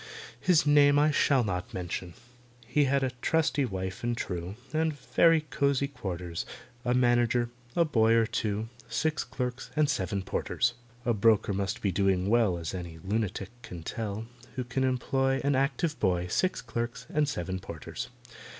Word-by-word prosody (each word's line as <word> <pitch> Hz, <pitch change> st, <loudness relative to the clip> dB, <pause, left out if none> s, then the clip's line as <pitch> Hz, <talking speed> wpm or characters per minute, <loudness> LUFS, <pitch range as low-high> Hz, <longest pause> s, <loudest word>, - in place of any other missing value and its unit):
His 170 Hz, +2 st, +4 dB
name 145 Hz, -1 st, +6 dB
I 150 Hz, +1 st, +4 dB
shall 140 Hz, -3 st, +3 dB
not 90 Hz, -4 st, -3 dB
mention. 90 Hz, -1 st, -4 dB, 0.5 s
He 145 Hz, +5 st, +2 dB
had 135 Hz, 0 st, +2 dB
a 130 Hz, -, 0 dB
trusty 155 Hz, -3 st, +2 dB
wife 95 Hz, -2 st, -4 dB
and 120 Hz, 0 st, 0 dB
true, 90 Hz, 0 st, -4 dB, 0.2 s
And 160 Hz, 0 st, +1 dB
very 165 Hz, -1 st, +4 dB
cosy 140 Hz, 0 st, +2 dB
quarters, 90 Hz, -10 st, -4 dB, 0.4 s
A 125 Hz, 0 st, +1 dB
manager, 120 Hz, -1 st, +3 dB, 0.2 s
a 170 Hz, -, +4 dB
boy 115 Hz, -7 st, +3 dB
or 115 Hz, -1 st, +4 dB
two, 110 Hz, -1 st, -2 dB, 0.2 s
Six 155 Hz, -1 st, 0 dB
clerks, 125 Hz, -1 st, -4 dB
and 155 Hz, -1 st, +4 dB
seven 100 Hz, -, -1 dB
porters. 120 Hz, -, 0 dB, 0.3 s
A 120 Hz, -, +3 dB
broker 105 Hz, -1 st, +3 dB
must 100 Hz, +1 st, -2 dB
be 100 Hz, -, +2 dB
doing 95 Hz, 0 st, +2 dB
well 110 Hz, -7 st, +3 dB
(As 85 Hz, 0 st, -4 dB
any 85 Hz, -3 st, -6 dB
lunatic 100 Hz, +2 st, -2 dB
can 90 Hz, -7 st, -8 dB
tell) 110 Hz, +3 st, -4 dB, 0.3 s
Who 130 Hz, -, -1 dB
can 125 Hz, +2 st, -1 dB
employ 135 Hz, +1 st, +1 dB
An 140 Hz, 0 st, +2 dB
active 140 Hz, +4 st, 0 dB
boy, 90 Hz, -3 st, +1 dB
Six 180 Hz, -, 0 dB
clerks, 120 Hz, +1 st, -4 dB
and 150 Hz, -1 st, +1 dB
seven 95 Hz, -4 st, -3 dB
porters. 85 Hz, -4 st, -6 dB
120 Hz, 160 wpm, -29 LUFS, 95-140 Hz, 0.5 s, name